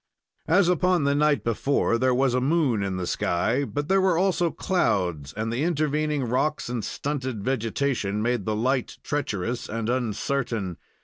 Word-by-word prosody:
As 180 +2 +4
upon 180 -1 +2
the 140 0 +2
night 150 0 +2
before, 115 +1 +1
there 130 +1 +3
was 130 0 +2
a 125 - +1
moon 135 -6 +2
in 95 -1 -2
the 90 - -2
sky, 110 +10 0
but 145 +1 -3
there 195 +1 +3
were 185 -3 +3
also 175 -2 +2
clouds, 90 - 0
and 110 +5 -3
the 120 - -1
intervening 150 -3 0
rocks 125 +4 0
and 120 -3 -3
stunted 130 -1 -3
vegetation 115 -3 -1
made 120 -2 0
the 110 - 0
light 125 +3 0
treacherous 120 -4 -2
and 115 +1 -3
uncertain. 115 -5 -1
130 Hz, 165 wpm, -25 LUFS, 110-150 Hz, -, As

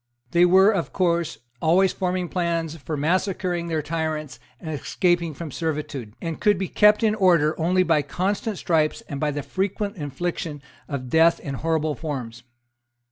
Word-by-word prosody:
They 175 0 +5
were 190 +3 +6
of 190 -6 -2
course 170 -3 0 0.2
always 180 +4 +4
forming 180 -1 -1
plans 170 -3 -1
for 155 +1 -5
massacring 175 +2 0
their 160 -2 -1
tyrants 155 -4 -3 0.2
and 160 - -6
escaping 170 +2 0
from 160 0 -7
servitude, 145 -8 -4
and 165 -2 -4
could 210 -2 +4
be 190 0 -2
kept 210 +3 +4
in 215 -1 +3
order 175 -7 +3
only 180 +3 +3
by 165 -4 +3
constant 195 +7 -2
stripes 155 -3 +1
and 140 - -7
by 150 - +1
the 145 0 -3
frequent 200 +4 -2
infliction 150 0 -4 0.2
of 130 -3 -5
death 165 +1 +5
in 140 - -6
horrible 155 +2 0
forms. 130 -6 -5
165 Hz, 160 wpm, -24 LUFS, 150-185 Hz, 0.2 s, were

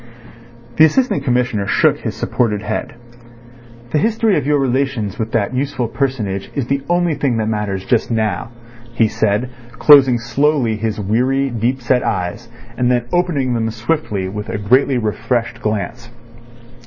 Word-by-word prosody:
The 160 - +8
Assistant 200 - +1
Commissioner 125 -6 0
shook - - +3
his - - -4
supported 105 -4 -1
head. 105 - -4 1.0
"The 150 - +2
history 225 +2 +2
of - - -1
your 150 0 +3
relations 130 -6 -1
with 110 0 -3
that 115 +1 0
useful 130 -2 -1
personage 110 -7 -2
is 140 -4 -1
the 140 +2 -1
only 175 -1 +2
thing 140 -5 0
that 110 -1 -1
matters 105 -3 -2
just 120 - +1
now," 110 -1 -1 0.5
he 115 -2 +3
said, 110 +4 -1 0.2
closing 135 0 +6
slowly 120 0 +1
his 110 0 -3
weary, 130 +7 0
deep 120 +3 -1
set 125 +1 +2
eyes, 100 +6 -3 0.3
and 125 0 +1
then 120 -1 +1
opening 160 -8 +1
them 115 -1 -1
swiftly 110 -4 -2
with 105 +3 -6
a - - -2
greatly 130 +6 +2
refreshed 115 +1 -2
glance. 110 +3 -3
120 Hz, 155 wpm, -18 LUFS, 110-135 Hz, 1.0 s, The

